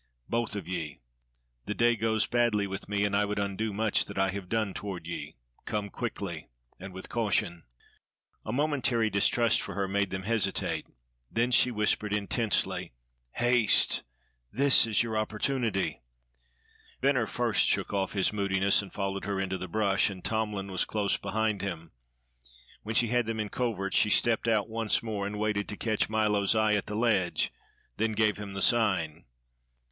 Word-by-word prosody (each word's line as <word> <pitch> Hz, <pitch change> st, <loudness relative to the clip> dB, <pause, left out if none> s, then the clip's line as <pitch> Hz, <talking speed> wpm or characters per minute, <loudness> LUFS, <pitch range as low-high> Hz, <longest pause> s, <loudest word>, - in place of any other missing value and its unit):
Both 115 Hz, -2 st, -1 dB
of 100 Hz, -5 st, -5 dB
ye. 85 Hz, -5 st, -4 dB, 0.7 s
The 105 Hz, -, -2 dB
day 120 Hz, 0 st, +3 dB
goes 110 Hz, 0 st, +1 dB
badly 120 Hz, -4 st, +1 dB
with 95 Hz, 0 st, -6 dB
me, 100 Hz, 0 st, +1 dB
and 100 Hz, -1 st, 0 dB
I 105 Hz, -, +3 dB
would 105 Hz, 0 st, -2 dB
undo 100 Hz, +2 st, -2 dB
much 110 Hz, +1 st, +1 dB
that -, -, -9 dB
I 95 Hz, 0 st, +2 dB
have 95 Hz, -2 st, -7 dB
done 110 Hz, -4 st, 0 dB
toward 95 Hz, -5 st, -6 dB
ye. 85 Hz, -, -6 dB, 0.3 s
Come 105 Hz, -2 st, -3 dB
quickly, 100 Hz, -9 st, -5 dB, 0.3 s
and 95 Hz, +1 st, -8 dB
with 95 Hz, +1 st, -9 dB
caution." 95 Hz, -7 st, -1 dB, 0.8 s
A -, -, -4 dB
momentary 130 Hz, -5 st, +1 dB
distrust 115 Hz, +3 st, +3 dB
for -, -, -6 dB
her 100 Hz, -1 st, -1 dB
made 100 Hz, 0 st, 0 dB
them 95 Hz, +1 st, -4 dB
hesitate; 95 Hz, -6 st, 0 dB, 0.4 s
then 120 Hz, +2 st, +1 dB
she 125 Hz, -, +5 dB
whispered 105 Hz, -2 st, 0 dB
intensely: 105 Hz, -, 0 dB, 0.4 s
"Haste. 120 Hz, -2 st, +3 dB, 0.5 s
This 140 Hz, -3 st, +5 dB
is 110 Hz, 0 st, +2 dB
your 115 Hz, -2 st, -4 dB
opportunity." 110 Hz, -, -1 dB, 1.0 s
Venner 130 Hz, -4 st, +2 dB
first 120 Hz, -3 st, +1 dB
shook -, -, 0 dB
off 95 Hz, -1 st, -1 dB
his 100 Hz, 0 st, +1 dB
moodiness 100 Hz, -1 st, +2 dB
and 100 Hz, -, -10 dB
followed 100 Hz, -1 st, -3 dB
her 100 Hz, -1 st, -2 dB
into 95 Hz, -1 st, -2 dB
the 95 Hz, -, -5 dB
brush; 100 Hz, +1 st, +1 dB
and 95 Hz, -2 st, -9 dB
Tomlin 105 Hz, -3 st, -2 dB
was 95 Hz, -, +1 dB
close 105 Hz, -2 st, 0 dB
behind 110 Hz, -1 st, -1 dB
him. 85 Hz, -5 st, -5 dB, 0.9 s
When 110 Hz, +1 st, -5 dB
she 120 Hz, -1 st, +3 dB
had 120 Hz, -1 st, +1 dB
them 115 Hz, -1 st, -2 dB
in 105 Hz, -1 st, -2 dB
covert, 100 Hz, -5 st, -2 dB
she 105 Hz, -, +4 dB
stepped 115 Hz, +2 st, +3 dB
out 110 Hz, -3 st, +2 dB
once 115 Hz, -1 st, 0 dB
more, 105 Hz, -3 st, -3 dB
waited 105 Hz, 0 st, -2 dB
to 105 Hz, -, -5 dB
catch 110 Hz, -3 st, 0 dB
Milo's 105 Hz, -1 st, +2 dB
eye 110 Hz, -1 st, +3 dB
at 105 Hz, -, 0 dB
the 105 Hz, -, -4 dB
ledge, 105 Hz, -6 st, +1 dB, 0.4 s
then 110 Hz, 0 st, 0 dB
gave 110 Hz, -1 st, +2 dB
him 100 Hz, -1 st, -7 dB
the 95 Hz, -, 0 dB
sign. 95 Hz, -9 st, +2 dB
105 Hz, 170 wpm, -29 LUFS, 100-115 Hz, 1.0 s, she